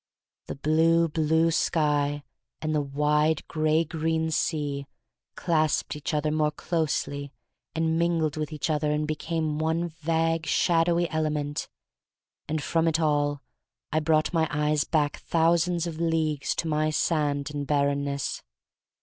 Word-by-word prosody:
The - - -5
blue, 165 +3 +3
blue 160 +1 +2
sky 145 -3 +1 0.4
and 155 0 -2
the 150 - +2
wide, 150 +2 +1
gray 155 0 +2
green 160 0 -1
sea 145 -3 -1 0.5
clasped 155 -4 0
each 150 +3 -4
other 150 0 0
more 155 -1 +2
closely 145 -3 -2 0.4
and 160 0 +1
mingled 165 -2 +1
with 155 0 -3
each 155 +1 -2
other 150 0 0
and 150 0 0
became 155 0 -2
one 160 +2 0
vague, 165 0 -1
shadowy 170 0 +2
element 150 -2 -2 0.4
— - - -65
and 155 -1 -1
from 165 0 +1
it 160 0 +2
all 145 -3 +1 0.5
I 155 - +2
brought 155 +1 +1
my 160 -2 +2
eyes 150 +1 +1
back 150 -3 0
thousands 170 +1 +1
of 165 -2 -5
leagues 160 -3 0
to 165 - -2
my 155 0 +1
sand 150 -2 0
and 145 -1 -4
barrenness. 140 -1 0
155 Hz, 140 wpm, -26 LUFS, 150-165 Hz, 0.5 s, blue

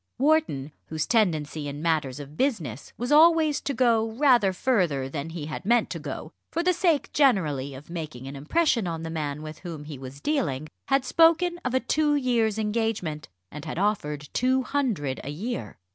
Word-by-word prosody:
Wharton, 270 - +1 0.2
whose 155 -1 -2
tendency 160 -9 +1
in 145 0 -5
matters 150 -5 0
of 145 +1 -9
business 160 - -2
was 245 +3 -3
always 315 -1 +5
to - - -2
go 230 -4 +2
rather 245 -6 +4
further 180 - +1
than 140 +3 -5
he 165 -2 -6
had 155 - -6
meant 235 +4 +2
to - - -4
go, - - -6 0.2
for 335 - -1
the 365 +1 +3
sake 340 -4 +1
generally 155 - +2
of 140 +3 -11
making 155 -7 -6
an 140 - -7
impression 230 - +1
on 165 -1 -4
the 165 - -5
man 150 -2 -3
with 155 0 -8
whom 165 -5 -7
he 150 -3 -8
was 135 +1 -9
dealing, 155 - -1 0.2
had 270 -1 +2
spoken 335 +1 +4
of 250 0 -1
a - - +4
two 295 +4 +1
years' 235 -6 +1
engagement, 210 - -2 0.2
and 150 +1 -8
had 155 - -5
offered 150 -8 -1
two 260 +1 +2
hundred 225 - -1
a - - -5
year. 150 - -5
185 Hz, 185 wpm, -26 LUFS, -, 0.2 s, always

